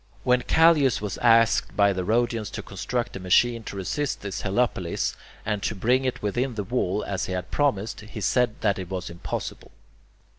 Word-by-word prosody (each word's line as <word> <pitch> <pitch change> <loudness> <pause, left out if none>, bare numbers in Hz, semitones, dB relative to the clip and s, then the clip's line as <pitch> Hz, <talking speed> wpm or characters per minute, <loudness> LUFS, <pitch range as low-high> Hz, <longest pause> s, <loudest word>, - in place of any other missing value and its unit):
When 125 0 +3
Callias 155 -2 +4
was 105 -2 -4
asked 115 0 +4
by 100 -1 +4
the 95 -1 -2
Rhodians 115 +1 0
to - - -5
construct 120 +5 -3
a - - -5
machine 115 +6 +3
to - - -6
resist 130 +9 -2
this 100 -2 -4
helepolis, 95 -4 0 0.3
and 105 -2 -1
to 110 - -2
bring 125 +6 +2
it 130 - -2
within 120 +5 -1
the 105 - -2
wall 105 -3 -1
as 95 -1 -2
he 95 - -3
had 90 0 -4
promised, 120 -7 0
he 110 +1 -9
said 120 +2 +1
that 100 -3 +1
it 90 -2 -6
was 90 -2 -4
impossible. 85 - -6
110 Hz, 185 wpm, -25 LUFS, 95-125 Hz, 0.3 s, Callias